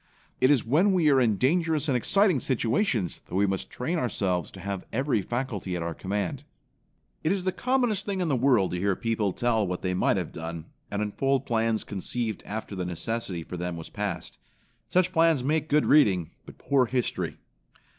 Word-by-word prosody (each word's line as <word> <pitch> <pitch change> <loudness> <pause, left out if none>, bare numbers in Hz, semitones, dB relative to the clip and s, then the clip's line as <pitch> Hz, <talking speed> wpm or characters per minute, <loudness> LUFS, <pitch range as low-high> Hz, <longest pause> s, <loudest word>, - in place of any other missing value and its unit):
It 130 - +4
is 145 -5 +3
when 170 - +3
we 165 -5 +4
are 135 -1 +5
in 110 -5 +2
dangerous 160 - +1
and 135 - +2
exciting 185 - +3
situations 120 - 0
that 90 - -6
we 100 +2 +3
must 95 -1 -2
train 160 +8 -2
ourselves 95 - -1
to - - -12
have 100 -2 -5
every 130 -2 +1
faculty 110 -5 -3
at 85 - -2
our 85 0 -3
command. 95 +1 -3 0.8
It 155 - +2
is 195 -2 0
the 185 - +1
commonest 245 -4 +1
thing 195 -2 -1
in 180 - 0
the 145 - +2
world 120 -7 +3
to 90 - -2
hear 100 +1 +1
people 110 -3 0
tell 110 -1 +1
what 90 0 -4
they 90 -1 0
might 90 - +2
have - - -3
done, 80 0 -6 0.2
and 100 +1 -1
unfold 135 +6 0
plans 115 -1 +1
conceived 110 +3 -3
after 110 0 -5
the 95 - -2
necessity 90 +1 -3
for 90 - -7
them 90 -1 -3
was 80 - -8
past. 100 -4 -4 0.5
Such 180 0 +2
plans 165 -5 +3
make 155 +3 0
good 150 +1 +3
reading, 95 - +4 0.2
but - - -12
poor 135 -3 +2
history. 125 -1 -2
115 Hz, 195 wpm, -27 LUFS, 95-150 Hz, 0.8 s, are